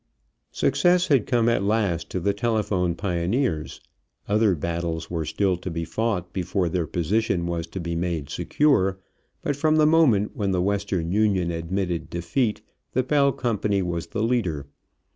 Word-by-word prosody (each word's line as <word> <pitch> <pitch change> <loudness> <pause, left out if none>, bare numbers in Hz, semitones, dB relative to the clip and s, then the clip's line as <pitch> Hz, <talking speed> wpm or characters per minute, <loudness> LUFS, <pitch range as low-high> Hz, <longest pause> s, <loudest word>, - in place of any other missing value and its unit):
Success 180 0 +2
had 135 -7 +3
come 120 -3 +2
at 115 - +2
last 100 -5 0
to 95 - -2
the 100 +3 +1
telephone 100 -5 0
pioneers. 90 - -1 0.5
Other 105 -2 +3
battles 85 +1 -3
were 80 -2 -2
still 95 +3 0
to 90 - -6
be 85 -1 -3
fought 95 -4 -2
before 90 -1 -1
their 85 -1 -1
position 90 +2 0
was 85 -1 -3
to 85 +3 -6
be 85 -1 -3
made 85 -4 -2
secure, 95 - +1 0.5
but 145 - 0
from 155 +2 +2
the 155 -1 +5
moment 150 -11 +3
when 100 -2 -1
the 90 - +1
Western 100 -4 -1
Union 100 -4 +2
admitted 85 +1 -2
defeat 95 +7 -1 0.3
the 130 - +2
Bell 140 +1 +3
company 105 -6 0
was 85 -1 -3
the 110 - -2
leader. 100 - 0
95 Hz, 160 wpm, -24 LUFS, 85-115 Hz, 0.5 s, the